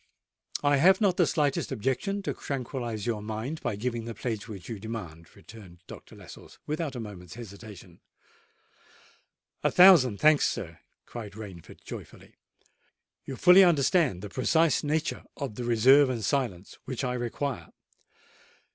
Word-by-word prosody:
"I 145 Hz, 0 st, +3 dB
have 190 Hz, +7 st, +5 dB
not 195 Hz, -5 st, +2 dB
the -, -, +3 dB
slightest 145 Hz, -4 st, 0 dB
objection 195 Hz, -, -2 dB
to -, -, -2 dB
tranquillise 120 Hz, -5 st, -5 dB
your 115 Hz, -3 st, -2 dB
mind 110 Hz, +9 st, -5 dB
by 120 Hz, -4 st, -2 dB
giving 115 Hz, +1 st, -3 dB
the 115 Hz, -1 st, -6 dB
pledge 110 Hz, -1 st, -4 dB
which 100 Hz, -5 st, -9 dB
you 115 Hz, -4 st, -6 dB
demand," 90 Hz, -7 st, -8 dB
returned 95 Hz, -6 st, -14 dB
Dr. -, -, -12 dB
Lascelles, -, -, -14 dB
without 150 Hz, -2 st, -3 dB
a -, -, -5 dB
moment's 100 Hz, -6 st, -9 dB
hesitation. 100 Hz, -5 st, -11 dB, 1.6 s
"A -, -, +3 dB
thousand 170 Hz, -, +6 dB
thanks, 155 Hz, -1 st, +5 dB
sir!" 85 Hz, -3 st, -5 dB, 0.3 s
cried 110 Hz, -4 st, -8 dB
Rainford 100 Hz, -6 st, -11 dB
joyfully. -, -, -11 dB, 0.9 s
"You 135 Hz, -, -6 dB
fully 180 Hz, +8 st, +7 dB
understand 155 Hz, -, +2 dB
the 105 Hz, -, -6 dB
precise 160 Hz, +8 st, +2 dB
nature 155 Hz, +2 st, -2 dB
of 140 Hz, -6 st, -4 dB
the 120 Hz, +3 st, -6 dB
reserve 130 Hz, +4 st, +5 dB
and 115 Hz, -5 st, -3 dB
silence 110 Hz, -10 st, -2 dB
which 130 Hz, 0 st, -4 dB
I 125 Hz, -1 st, -1 dB
require?" 125 Hz, +2 st, -4 dB
120 Hz, 145 wpm, -27 LUFS, 105-145 Hz, 1.6 s, fully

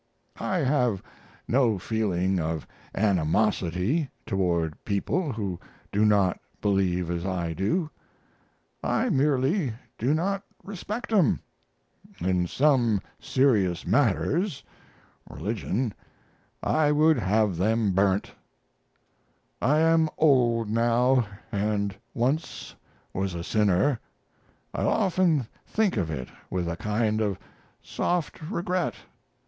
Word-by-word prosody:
I 190 Hz, -, -1 dB
have 125 Hz, -8 st, +1 dB, 0.4 s
no 120 Hz, -4 st, +3 dB
feeling 95 Hz, -3 st, 0 dB
of 80 Hz, -1 st, -2 dB, 0.3 s
animosity 100 Hz, -, +1 dB, 0.2 s
toward 85 Hz, -6 st, -1 dB
people 140 Hz, -, -1 dB
who 100 Hz, -6 st, -3 dB, 0.3 s
do 105 Hz, +2 st, +3 dB
not 100 Hz, -3 st, +3 dB, 0.2 s
believe 90 Hz, -4 st, +1 dB
as 85 Hz, -1 st, -2 dB
I 90 Hz, -3 st, -2 dB
do; 105 Hz, -, 0 dB, 1.0 s
I 255 Hz, -, +1 dB
merely 140 Hz, -, +2 dB, 0.3 s
do 130 Hz, +7 st, +2 dB
not 195 Hz, +4 st, 0 dB, 0.2 s
respect 210 Hz, +5 st, -5 dB
'em. 190 Hz, -8 st, +4 dB, 0.8 s
In 90 Hz, 0 st, +1 dB
some 125 Hz, -, +3 dB, 0.2 s
serious 105 Hz, -10 st, +2 dB
matters 145 Hz, -, +1 dB, 0.7 s
(relig.) 110 Hz, +1 st, -2 dB, 0.7 s
I 150 Hz, -2 st, +3 dB
would 155 Hz, +1 st, +4 dB
have 105 Hz, -1 st, +1 dB
them 110 Hz, +2 st, +2 dB
burnt. 95 Hz, +1 st, +1 dB, 1.3 s
I 150 Hz, +4 st, +3 dB
am 165 Hz, -1 st, +4 dB
old 120 Hz, -7 st, +3 dB
now 120 Hz, +2 st, +3 dB, 0.2 s
and 100 Hz, -1 st, -1 dB, 0.2 s
once 135 Hz, +7 st, -1 dB, 0.4 s
was 95 Hz, -1 st, -2 dB
a 85 Hz, -, -4 dB
sinner. 105 Hz, +5 st, +2 dB, 0.7 s
I -, -, -2 dB
often 180 Hz, -, +2 dB, 0.2 s
think 215 Hz, -, +1 dB
of 90 Hz, -7 st, -1 dB
it 65 Hz, -5 st, -4 dB, 0.2 s
with 90 Hz, -2 st, -2 dB
a 85 Hz, -, -2 dB
kind 110 Hz, +2 st, 0 dB
of 100 Hz, -3 st, 0 dB, 0.5 s
soft 175 Hz, -3 st, -2 dB
regret. 180 Hz, -2 st, -1 dB
110 Hz, 105 wpm, -26 LUFS, 95-145 Hz, 1.3 s, em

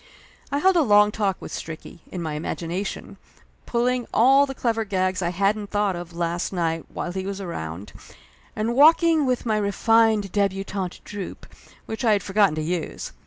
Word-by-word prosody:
I 280 Hz, -, +1 dB
held 375 Hz, +5 st, +3 dB
a -, -, +5 dB
long 210 Hz, -5 st, +5 dB
talk 200 Hz, -3 st, -1 dB
with -, -, -9 dB
Stricky, 160 Hz, +1 st, -8 dB
in 180 Hz, -2 st, -5 dB
my 155 Hz, -2 st, -3 dB
imagination, 170 Hz, +5 st, -4 dB, 0.5 s
pulling 245 Hz, 0 st, 0 dB
all 270 Hz, +5 st, +5 dB
the 270 Hz, -, -6 dB
clever 225 Hz, -3 st, 0 dB
gags 185 Hz, -2 st, -1 dB
I 170 Hz, -, 0 dB
hadn't 200 Hz, +3 st, 0 dB
thought 205 Hz, -2 st, 0 dB
of 175 Hz, 0 st, -7 dB
last 170 Hz, 0 st, -2 dB
night 165 Hz, -3 st, -1 dB
while 175 Hz, -, -4 dB
he 190 Hz, +1 st, -4 dB
was 195 Hz, +1 st, -4 dB
around, 95 Hz, -, -6 dB, 0.6 s
and 220 Hz, +2 st, -1 dB
walking 315 Hz, +2 st, +5 dB
with 250 Hz, -1 st, -1 dB
my 220 Hz, -2 st, +1 dB
re 205 Hz, -1 st, 0 dB
fined 220 Hz, -2 st, +3 dB
debutante 195 Hz, -2 st, -2 dB
droop, 205 Hz, -3 st, -7 dB, 0.4 s
which 220 Hz, +3 st, -5 dB
I 225 Hz, -3 st, +4 dB
had 200 Hz, -3 st, 0 dB
forgotten 195 Hz, -4 st, +2 dB
to 155 Hz, -, -2 dB
use. 170 Hz, 0 st, -4 dB
200 Hz, 175 wpm, -24 LUFS, 175-225 Hz, 0.6 s, a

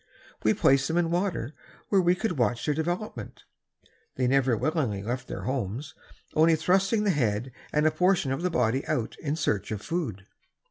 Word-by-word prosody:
We 110 Hz, -, +3 dB
placed 135 Hz, 0 st, +3 dB
them 165 Hz, -, -1 dB
in 170 Hz, -1 st, +1 dB
water, 175 Hz, -8 st, -1 dB, 0.4 s
where 195 Hz, -2 st, +4 dB
we 175 Hz, 0 st, +3 dB
could 220 Hz, +3 st, -1 dB
watch 120 Hz, -1 st, +1 dB
their 150 Hz, -, +2 dB
development. 160 Hz, -, -4 dB, 0.7 s
They 130 Hz, -, 0 dB
never 130 Hz, -2 st, +3 dB
willingly 125 Hz, -, -1 dB
left 125 Hz, +3 st, -3 dB
their -, -, -6 dB
homes, 130 Hz, +2 st, -3 dB, 0.4 s
only 160 Hz, +1 st, +5 dB
thrusting 195 Hz, +6 st, +2 dB
the 205 Hz, -, +3 dB
head 120 Hz, -, 0 dB, 0.2 s
and 150 Hz, +1 st, +2 dB
a 155 Hz, -, +5 dB
portion 180 Hz, -6 st, +2 dB
of 135 Hz, -, -2 dB
the 180 Hz, -, +1 dB
body 130 Hz, -4 st, +1 dB
out 115 Hz, -2 st, -1 dB
in 145 Hz, 0 st, -2 dB
search 105 Hz, -, -1 dB
of 105 Hz, -2 st, -4 dB
food. 125 Hz, -, -3 dB
145 Hz, 180 wpm, -27 LUFS, 120-175 Hz, 0.7 s, only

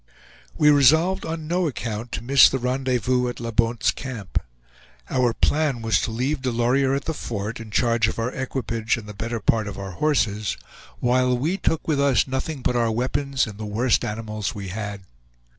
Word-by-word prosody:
We 150 Hz, 0 st, +6 dB
resolved 160 Hz, +7 st, +4 dB
on 160 Hz, -1 st, -4 dB
no 175 Hz, +1 st, +1 dB
account 115 Hz, -4 st, -4 dB
to 115 Hz, -, -4 dB
miss 135 Hz, +2 st, +7 dB
the 135 Hz, -, -1 dB
rendezvous 125 Hz, -1 st, 0 dB
at 120 Hz, -, -5 dB
La 115 Hz, 0 st, -4 dB
Bonte's 115 Hz, +1 st, +2 dB
Camp. 115 Hz, -8 st, -4 dB, 0.7 s
Our 125 Hz, -2 st, +2 dB
plan 145 Hz, -1 st, 0 dB
was 110 Hz, 0 st, +2 dB
to -, -, -2 dB
leave 130 Hz, +6 st, -1 dB
Delorier 130 Hz, +2 st, +1 dB
at 140 Hz, -, -3 dB
the 160 Hz, -, -1 dB
fort, 110 Hz, -5 st, -4 dB
in 115 Hz, -1 st, -9 dB
charge 115 Hz, 0 st, +2 dB
of 110 Hz, -, -3 dB
our 115 Hz, +2 st, -1 dB
equipage 120 Hz, -4 st, -2 dB
and 115 Hz, -, -8 dB
the 105 Hz, -, -7 dB
better 115 Hz, +3 st, -4 dB
part 110 Hz, 0 st, +1 dB
of 100 Hz, -, -6 dB
our 95 Hz, -1 st, -6 dB
horses, 110 Hz, -, 0 dB, 0.4 s
while 125 Hz, 0 st, +2 dB
we 155 Hz, +9 st, 0 dB
took 165 Hz, -4 st, -1 dB
with 150 Hz, -3 st, +1 dB
us 135 Hz, -6 st, +3 dB
nothing 130 Hz, +1 st, -4 dB
but 125 Hz, -, +1 dB
our 120 Hz, -1 st, +2 dB
weapons 130 Hz, +3 st, 0 dB
and 105 Hz, -2 st, -9 dB
the 110 Hz, -, -4 dB
worst 115 Hz, +4 st, +1 dB
animals 110 Hz, -1 st, -4 dB
we 100 Hz, -2 st, -6 dB
had. 100 Hz, 0 st, -5 dB
120 Hz, 190 wpm, -23 LUFS, 110-135 Hz, 0.7 s, miss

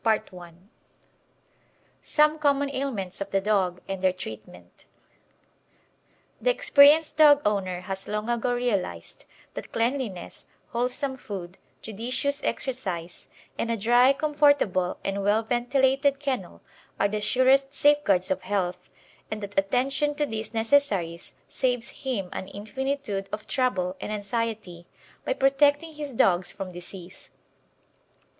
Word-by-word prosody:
CHAPTER 220 Hz, -4 st, 0 dB
LI 175 Hz, -2 st, -11 dB, 1.5 s
SOME 305 Hz, 0 st, +2 dB
COMMON 285 Hz, -1 st, +2 dB
AILMENTS 230 Hz, -10 st, -4 dB
OF 200 Hz, -, -3 dB
THE 195 Hz, -, +1 dB
DOG 190 Hz, -3 st, 0 dB
AND 195 Hz, -1 st, -4 dB
THEIR 185 Hz, -1 st, +3 dB
TREATMENT 110 Hz, -, -10 dB, 1.6 s
The -, -, +2 dB
experienced 315 Hz, -12 st, +5 dB
dog 295 Hz, -2 st, +7 dB
owner 190 Hz, -4 st, 0 dB
has 190 Hz, +1 st, -6 dB
long 210 Hz, +1 st, -3 dB
ago 240 Hz, +1 st, 0 dB
realised 205 Hz, -, -2 dB, 0.3 s
that -, -, -8 dB
cleanliness, 230 Hz, -6 st, -3 dB, 0.2 s
wholesome 255 Hz, +3 st, -2 dB
food, 190 Hz, -6 st, -8 dB, 0.2 s
judicious 250 Hz, +6 st, -2 dB
exercise 185 Hz, -10 st, -4 dB, 0.3 s
and 230 Hz, -, -1 dB
a 230 Hz, -, 0 dB
dry, 240 Hz, +5 st, +5 dB
comfortable 285 Hz, -11 st, +2 dB
and 195 Hz, +1 st, -1 dB
well 210 Hz, +3 st, +2 dB
ventilated 265 Hz, +4 st, +1 dB
kennel 255 Hz, -, -4 dB, 0.4 s
are 200 Hz, -, +3 dB
the 210 Hz, +1 st, -3 dB
surest 265 Hz, +5 st, +3 dB
safeguards 280 Hz, -13 st, +3 dB
of 190 Hz, -, 0 dB
health, 185 Hz, -2 st, -3 dB, 0.4 s
and 215 Hz, -1 st, -5 dB
that 200 Hz, 0 st, 0 dB
attention 270 Hz, +8 st, 0 dB
to 295 Hz, 0 st, 0 dB
these 220 Hz, -4 st, -5 dB
necessaries 220 Hz, -8 st, 0 dB
saves 245 Hz, -2 st, -1 dB
him 240 Hz, -8 st, -2 dB
an 190 Hz, -, -5 dB
infinitude 215 Hz, -1 st, -4 dB
of 210 Hz, 0 st, -5 dB
trouble 190 Hz, -8 st, 0 dB
and -, -, -4 dB
anxiety 210 Hz, -4 st, -4 dB, 0.4 s
by -, -, 0 dB
protecting 290 Hz, -, +2 dB
his 295 Hz, -2 st, -6 dB
dogs 185 Hz, -6 st, +2 dB
from 195 Hz, -2 st, -7 dB
disease. 175 Hz, +1 st, -10 dB
225 Hz, 125 wpm, -26 LUFS, 195-275 Hz, 1.6 s, dog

